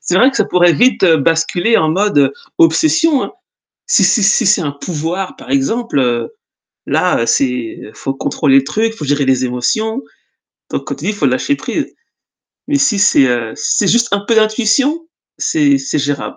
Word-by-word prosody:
C'est 165 Hz, +4 st, -3 dB
vrai 255 Hz, +7 st, +5 dB
que 275 Hz, -, -7 dB
ça -, -, +2 dB
pourrait 175 Hz, -1 st, +3 dB
vite 245 Hz, -1 st, +2 dB
basculer 165 Hz, +6 st, +2 dB
en 155 Hz, -, +1 dB
mode 160 Hz, -7 st, +1 dB, 0.3 s
obsession, 310 Hz, -, +3 dB
hein. -, -, -9 dB, 0.5 s
Si 200 Hz, -, +3 dB
si 195 Hz, +4 st, +2 dB
si 195 Hz, 0 st, +2 dB
c'est 200 Hz, -1 st, +3 dB
un 150 Hz, -4 st, -2 dB
pouvoir 170 Hz, +5 st, -5 dB
par -, -, -13 dB
exemple, 135 Hz, -, -1 dB, 0.6 s
là, -, -, +1 dB
heu, 115 Hz, -, -2 dB
c'est 125 Hz, -4 st, -1 dB
faut 135 Hz, -, -4 dB
contrôler 135 Hz, 0 st, +1 dB
le 135 Hz, -, 0 dB
truc, 220 Hz, +10 st, -1 dB
faut 155 Hz, -, -8 dB
gérer 145 Hz, 0 st, 0 dB
les 130 Hz, -1 st, +1 dB
émotions. 215 Hz, -, -2 dB, 0.7 s
Donc -, -, -4 dB
comme -, -, -5 dB
tu -, -, -8 dB
dis: 210 Hz, -, 0 dB
«Faut 205 Hz, -, -2 dB
lâcher 135 Hz, -, 0 dB
prise» -, -, -4 dB, 0.8 s
mais 285 Hz, -, +1 dB
si, 275 Hz, -7 st, +2 dB, 0.3 s
heu, 120 Hz, -2 st, -2 dB
si 150 Hz, -, -1 dB
c'est 205 Hz, -, +1 dB
juste 235 Hz, 0 st, +2 dB
un 200 Hz, -, +1 dB
peu 230 Hz, -, +1 dB
d'intuition, 240 Hz, +9 st, +1 dB, 0.3 s
c'est 290 Hz, -3 st, +2 dB
c'est 270 Hz, -, -3 dB
géra 145 Hz, 0 st, -3 dB
180 Hz, 180 wpm, -15 LUFS, 140-230 Hz, 0.8 s, vrai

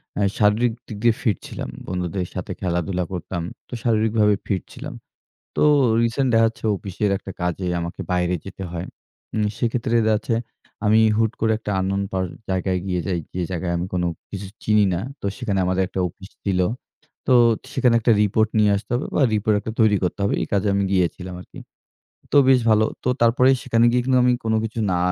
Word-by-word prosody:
অ্যা 100 Hz, -, 0 dB
শারীরিক 110 Hz, +3 st, +3 dB
দিক 110 Hz, -, -7 dB
দিয়ে 115 Hz, -2 st, +4 dB
ফিট 105 Hz, -5 st, +1 dB
ছিলাম। -, -, -6 dB, 0.2 s
বন্ধুদের 90 Hz, 0 st, -2 dB
সাথে -, -, -4 dB
খেলাধুলা 90 Hz, +1 st, -1 dB
করতাম। 90 Hz, 0 st, -4 dB, 0.3 s
তো -, -, -13 dB
শারীরিকভাবে 110 Hz, -2 st, +3 dB
ফিট 95 Hz, -3 st, 0 dB
ছিলাম। -, -, -7 dB, 0.6 s
তো -, -, +2 dB, 0.4 s
রিসেন্ট 120 Hz, +3 st, +1 dB
দেখা 115 Hz, 0 st, +5 dB
হচ্ছে 115 Hz, -, -12 dB
অফিসের 100 Hz, +1 st, -2 dB
একটা 95 Hz, -, -9 dB
কাজে 90 Hz, +1 st, -2 dB
আমাকে 85 Hz, 0 st, -5 dB
বাইরে 90 Hz, 0 st, +1 dB
যেতে 95 Hz, 0 st, -8 dB
হয়। 85 Hz, +1 st, -5 dB, 0.5 s
উম 105 Hz, -1 st, +1 dB
সেক্ষেত্রে 120 Hz, 0 st, -1 dB
দেখাচ্ছে 110 Hz, +1 st, +1 dB, 0.5 s
আমি 110 Hz, +1 st, +5 dB, 0.2 s
হুট 110 Hz, 0 st, +2 dB
করে 110 Hz, 0 st, +2 dB
একটা 110 Hz, -, -5 dB
unknown 95 Hz, +1 st, 0 dB
পা 95 Hz, -, 0 dB, 0.3 s
জায়গায় 95 Hz, 0 st, 0 dB
গিয়ে 90 Hz, -2 st, -1 dB
যাই। 90 Hz, -3 st, -1 dB
যে 90 Hz, -, -2 dB
জায়গায় 90 Hz, -1 st, -2 dB
আমি 85 Hz, +1 st, -2 dB
কোনো 90 Hz, -1 st, 0 dB, 0.2 s
কিছু 100 Hz, 0 st, -6 dB, 0.2 s
চিনি 105 Hz, -1 st, +4 dB
না। 85 Hz, -, -1 dB, 0.2 s
তো -, -, -4 dB
সেখানে 110 Hz, -7 st, -2 dB
আমাদের 95 Hz, +1 st, +1 dB
একটা 95 Hz, -, -3 dB
অফিস 95 Hz, +4 st, -14 dB
ছিল। 95 Hz, -2 st, +1 dB, 0.7 s
তো 130 Hz, -, +4 dB, 0.4 s
সেখানে 125 Hz, -4 st, +3 dB
একটা 115 Hz, +1 st, +4 dB
রিপোর্ট 110 Hz, +2 st, +2 dB
নিয়ে 105 Hz, -1 st, +4 dB
আসতে 100 Hz, -, -7 dB
হবে 125 Hz, -, -1 dB
বা -, -, +3 dB
রিপোর্ট 105 Hz, +1 st, +2 dB
একটা 110 Hz, -, -5 dB
তৈরি 110 Hz, -2 st, +5 dB
করতে 90 Hz, +2 st, -2 dB
হবে। 100 Hz, -, +1 dB
এই -, -, -2 dB
কাজে 100 Hz, 0 st, +1 dB
আমি 100 Hz, 0 st, +1 dB
গিয়েছিলাম 90 Hz, 0 st, -1 dB
আরকি। -, -, -13 dB, 0.7 s
তো -, -, +5 dB
বেশ 130 Hz, -1 st, +6 dB
ভালো। 110 Hz, 0 st, +5 dB, 0.2 s
তো -, -, +1 dB
তারপরেই 125 Hz, +3 st, +5 dB
সেখানে 115 Hz, -2 st, +3 dB
গিয়ে 125 Hz, 0 st, +2 dB, 0.2 s
আমি 125 Hz, 0 st, +4 dB
কোনো 110 Hz, 0 st, +1 dB
কিছু 115 Hz, +1 st, -4 dB
না 90 Hz, -, +1 dB
105 Hz, 190 wpm, -22 LUFS, 90-115 Hz, 0.7 s, বেশ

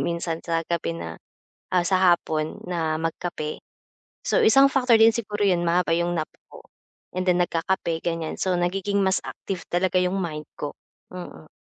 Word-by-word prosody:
minsan 170 Hz, -1 st, -2 dB
sa 165 Hz, -1 st, 0 dB
gabi 170 Hz, -1 st, -2 dB
na, -, -, -6 dB, 0.6 s
ah, 180 Hz, -1 st, +3 dB
sa 185 Hz, 0 st, +3 dB, 0.2 s
hapon 155 Hz, -2 st, -3 dB
na 160 Hz, -3 st, 0 dB
magkape. 165 Hz, -1 st, -3 dB, 0.7 s
So -, -, +3 dB
isang 270 Hz, +5 st, +7 dB
factor 250 Hz, -3 st, +4 dB
din 225 Hz, 0 st, +7 dB
siguro 210 Hz, -3 st, -3 dB
'yon, 180 Hz, -3 st, +2 dB
mahaba 170 Hz, 0 st, +2 dB
'yong 170 Hz, 0 st, 0 dB
nap 155 Hz, -, -1 dB, 0.2 s
ko, -, -, -12 dB, 0.5 s
and 185 Hz, -, 0 dB
then 180 Hz, -1 st, +4 dB
nagkakape, 170 Hz, -1 st, -1 dB
ganiyan. 165 Hz, -2 st, -2 dB
So 185 Hz, -1 st, +1 dB
nagiging 195 Hz, +3 st, 0 dB
mas 190 Hz, 0 st, +2 dB
active 185 Hz, -4 st, -5 dB
talaga 185 Hz, +1 st, +2 dB
'yong 180 Hz, +2 st, 0 dB
mind 155 Hz, -4 st, -4 dB
ko, 145 Hz, -, -4 dB, 0.4 s
mm. 175 Hz, -3 st, -9 dB
175 Hz, 165 wpm, -24 LUFS, 165-190 Hz, 0.7 s, isang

